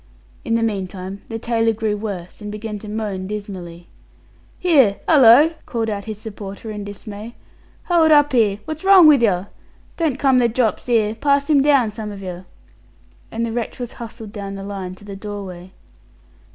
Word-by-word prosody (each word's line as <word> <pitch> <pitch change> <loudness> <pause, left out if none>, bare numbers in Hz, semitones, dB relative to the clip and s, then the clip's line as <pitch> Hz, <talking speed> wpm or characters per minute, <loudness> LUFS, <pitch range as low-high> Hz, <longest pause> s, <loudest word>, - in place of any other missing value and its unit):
In 230 - 0
the 230 - +1
meantime 195 -2 -4
the 225 - -4
tailor 225 -1 +1
grew 215 -1 -1
worse, 200 -3 -6
and 210 0 -6
began 210 0 -6
to 210 - -9
moan 205 -3 -4
dismally. 185 -5 -7 0.7
"Here! 275 - +4
'ullo!" 290 +2 +7
called 225 -2 -2
out 200 -1 -4
his 215 -2 -6
supporter, 210 0 -8
in 210 -1 -6
dismay. 205 +2 -9 0.5
"Hold 335 -3 +3
up 290 -2 +5
'ere! 215 -5 +3
Wot's 315 +1 -6
wrong 385 -3 +8
with 295 -5 +7
yer? 195 -4 +1 0.5
Don't 315 -6 0
come 265 -2 +3
the 240 -1 +3
drops 235 +1 -1
'ere. 220 -3 +2
Pass 280 +4 +1
him 285 -2 +5
down, 275 -6 +3
some 215 0 -6
of 200 -1 -9
yer," 180 0 -7 0.8
and 230 +1 -2
the 230 - -4
wretch 235 0 -4
was 245 -1 -5
hustled 225 -2 -8
down 200 -2 -6 0.4
to 205 - -16
the 200 -1 -8
doorway. 195 -3 -8
220 Hz, 170 wpm, -20 LUFS, 200-245 Hz, 0.8 s, wrong